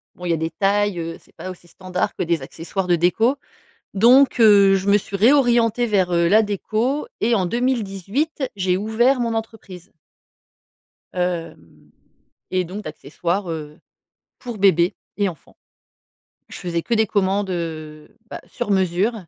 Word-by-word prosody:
bon, 180 - -9
il - - -2
y - - +3
a 165 - 0
des 160 +1 -2
tailles, 205 -1 0
heu, 165 0 -5
c'est - - -25
pas 185 - -7
aussi 175 -1 -11
standard 185 +1 -4
que - - -2
des 170 -3 0
accessoires 175 +7 -5
de 175 - +4
déco. 220 - +2 0.6
Donc, 250 +7 +5
heu, 200 -3 +6
je 195 +1 -3
me 205 +1 +5
suis 195 0 -6
réorientée 240 0 +3
vers, 190 -5 +1
heu, 170 0 +3
la 215 +3 +5
déco 220 - -2
et 235 +1 +2
en 190 -4 +1
2018, 240 - -2
j'ai 185 -1 +1
ouvert 230 +6 +1
mon 230 -1 -1
entreprise 220 -6 -7 1.2
hem 165 - -5 0.6
et 185 0 +1
donc 200 +5 -7
d'accessoires, 170 +4 -4
heu, 150 -2 -7 0.6
pour 240 -3 -7
bébés 190 -1 +3 0.2
et 205 -1 +1
enfants. 165 -6 -14 0.9
Je - - -9
faisais 170 -2 -3
que 235 - -1
des 220 -1 +2
commandes, 195 0 0
heu, 155 -3 -6 0.2
bah, - - -7
sur - - -5
mesure 190 +3 +1
195 Hz, 160 wpm, -21 LUFS, 175-220 Hz, 1.2 s, heu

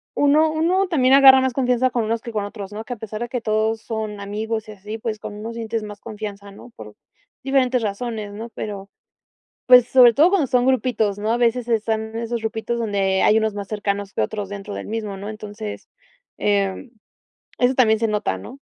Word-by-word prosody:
uno 300 +2 +4
uno 360 +5 +1
también 265 -7 +3
agarra 270 -1 +8
más 260 0 +1
confianza 250 0 +1
con 240 -3 -1
unos 230 +1 -1
que 235 - -7
con 210 -2 -2
otros, 205 -1 -8
¿no?, 220 +2 -7
que 250 - -4
a - - -6
pesar 215 +1 -7
de 240 - -2
que 245 0 -4
todos 220 0 0
son 215 -2 -5
amigos 215 +2 -4
y - - -6
así, 210 +2 -7
pues 215 -1 -4
con 205 - -7
unos 225 +2 -7
sientes 225 -1 -3
más 205 -1 -9
confianza, 205 -2 -7
¿no? 205 +5 -13
Por 105 -1 -10 0.5
diferentes 260 -2 +2
razones, 215 0 -4
¿no?, 220 +3 -7
pero, 200 -2 -6 0.8
pues 250 -1 +7
sobre 245 -3 +7
todo 310 +8 +5
cuando 370 -7 +2
son 250 +1 +2
grupitos, 225 -5 +1
¿no? 215 +2 -1
A 235 - +1
veces 240 0 +1
están 220 -1 -1
esos 230 0 -3
grupitos 225 +1 -3
donde 200 -4 0
hay 215 - +5
unos 220 -1 -1
más 200 -1 -5
cercanos 200 -1 -3
que - - -1
otros 205 -2 -3
dentro 200 0 -7
del - - -6
mismo, 215 -2 -4
¿no? 200 +2 -7
Entonces, 210 0 -8 0.5
eh, 200 +4 -1 0.7
eso 250 +1 +3
también 220 -4 +4
se 225 - +1
nota, 210 - -1
¿no? 255 - -10
220 Hz, 205 wpm, -21 LUFS, 205-245 Hz, 0.8 s, agarra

